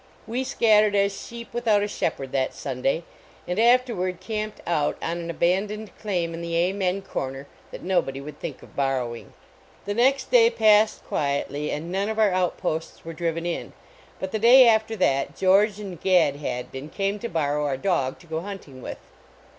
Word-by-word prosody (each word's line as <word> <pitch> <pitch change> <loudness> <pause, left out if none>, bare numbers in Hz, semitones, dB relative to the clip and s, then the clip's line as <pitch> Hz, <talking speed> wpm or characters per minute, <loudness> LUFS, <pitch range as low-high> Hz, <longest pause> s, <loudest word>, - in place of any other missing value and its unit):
We 245 +3 -2
scattered 215 -5 +3
as 200 0 +2
sheep 235 0 -9
without 225 -4 +2
a - - 0
shepherd 140 -9 -3
that 130 -1 -1
Sunday, 135 +4 -1 0.4
and 180 +3 -1
after 245 +1 +4
ward 180 -1 -2
camped 215 +2 -4
out 150 -4 0
on 170 +1 -3
an 170 0 -6
abandoned 200 +5 0
claim 175 -6 -2
in 165 - -6
the 170 0 -3
Amen 185 +2 0
corner 135 -5 -5 0.2
that - - -9
nobody 175 -7 0
would 145 +1 -9
think - - -6
of - - -16
borrowing. 130 -4 -2 0.5
The 205 - -2
next 265 +5 +2
day 470 -2 +7
passed 215 - +3
quietly 145 +1 -2
and 160 +4 -4
none 195 +3 -1
of 220 - -3
our 215 -3 +4
outposts 175 -3 -2
were 165 - -6
driven 165 0 -2
in, 175 - -4 0.5
but 190 - -4
the 220 - -1
day 245 +3 +8
after 220 0 +3
that 140 -9 +1
George 195 +2 +3
and 190 -5 -7
Gad 175 -7 +3
Hadbin 130 +1 -5
came 200 +4 -2
to 235 - -4
borrow 150 -2 0
our 135 -2 -1
dog 135 -5 0
to - - -16
go 160 -1 -3
hunting 180 -9 -9
with. - - -6
185 Hz, 180 wpm, -25 LUFS, 150-210 Hz, 0.5 s, day